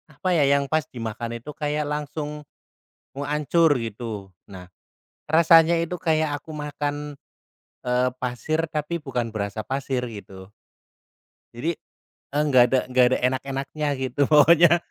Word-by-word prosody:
Apa 165 +5 -2
ya, 155 -4 +4
yang 140 0 +3
pas 155 +2 -1
dimakan 115 0 -5
itu 120 +6 -9
kayak 150 0 -2
langsung 150 0 -4 0.7
mau 140 +1 -5
hancur, 150 +1 +2
gitu. 110 -4 -6 0.2
Nah, 95 -2 -10 0.6
rasanya 165 +1 +5
itu 170 +2 -3
kayak 155 -3 0
aku 155 +2 -11
makan, 145 -1 -4 0.7
eee, 125 +1 +2
pasir, 130 +6 -2
tapi 155 +1 -3
bukan 125 -7 -3
berasa 105 0 -4
pasir, 130 +2 -2
gitu. 95 -3 -11 1.0
Jadi, 155 +9 -2 0.5
eee, 145 +1 0
enggak 130 -4 +6
ada 130 - +3
nggak 125 0 +4
ada - - +3
enak-enaknya, 135 +3 -2
gitu, 130 +1 -5
pokoknya. 165 +3 +6
145 Hz, 135 wpm, -24 LUFS, 125-155 Hz, 1.0 s, enggak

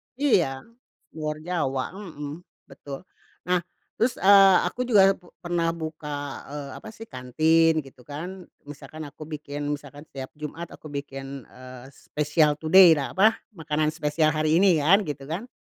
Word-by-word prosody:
Iya 170 - +1 0.5
luar 155 0 -3
Jawa, 145 -7 -1
mhm, 160 -4 -8 0.2
betul. 140 +5 -9 0.4
Nah, 180 0 +3 0.4
terus, 235 +2 +2
eee, 195 -1 +7
aku 250 +7 -3
juga 195 -4 +6 0.3
pernah 170 -1 0
buka, 150 -3 -6
eee, 145 -1 -7
apa - - -11
sih, 225 - -10
kantin 155 +5 +2
gitu 130 -2 -17
kan. 175 +5 -7 0.2
Misalkan 145 +2 -10
aku 155 - -11
bikin, 145 -1 -5
misalkan 145 +1 -13
setiap 135 -1 -8
jumat 155 +3 -7
aku 155 - -11
bikin, 140 -2 -7
eee, 130 0 -12
spesial 150 +1 +1
today, 165 +3 +7
da 140 -2 -3
apa, 220 +3 +5 0.2
makanan 155 -4 -1
spesial 155 0 +1
hari 155 +2 +2
ini 185 -5 +5
kan, 185 +8 +5
gitu 145 -5 -6
kan. 195 +11 -5
155 Hz, 145 wpm, -25 LUFS, 145-175 Hz, 0.5 s, eee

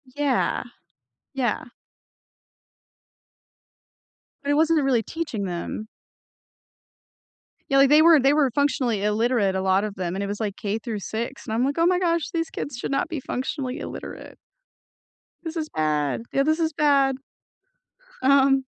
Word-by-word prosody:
Yeah, 285 -3 0 0.7
yeah. 250 -4 -1 2.8
But 285 - 0
it - - +3
wasn't 320 +1 +3
a - - 0
really 250 -5 +2
teaching 250 -11 -4
them. 180 +4 -5 1.8
Yeah, 275 - +3
like 275 - +6
they 300 +2 +7
were 330 -2 +7
they 270 +1 +4
were 295 -3 +3
functionally 250 -6 0
illiterate, 210 -1 +1
a 190 - 0
lot 190 +1 +2
of 210 -1 -4
them, 180 -1 -3
and 200 - -2
it - - -3
was 205 +1 -4
like 210 -3 -2
K 205 +1 -2
through 220 -2 -4
6, 230 +6 -5
and 220 - -4
I'm 240 +3 +1
like, 280 +2 -1
"Oh 335 - +3
my 360 0 +3
gosh, 335 -3 0
these 330 -1 -1
kids 280 -4 -6
should 245 - -4
not 275 - 0
be 320 - -3
functionally 260 0 -4
illiterate." - - -8 1.1
"This 325 -1 -5
is 310 -1 -3
bad. 150 +3 -1
Yeah, 275 - +3
this 315 +3 +1
is 320 -2 0
bad." 280 -3 +3 1.0
Um 270 0 +4
265 Hz, 155 wpm, -24 LUFS, 210-295 Hz, 2.8 s, they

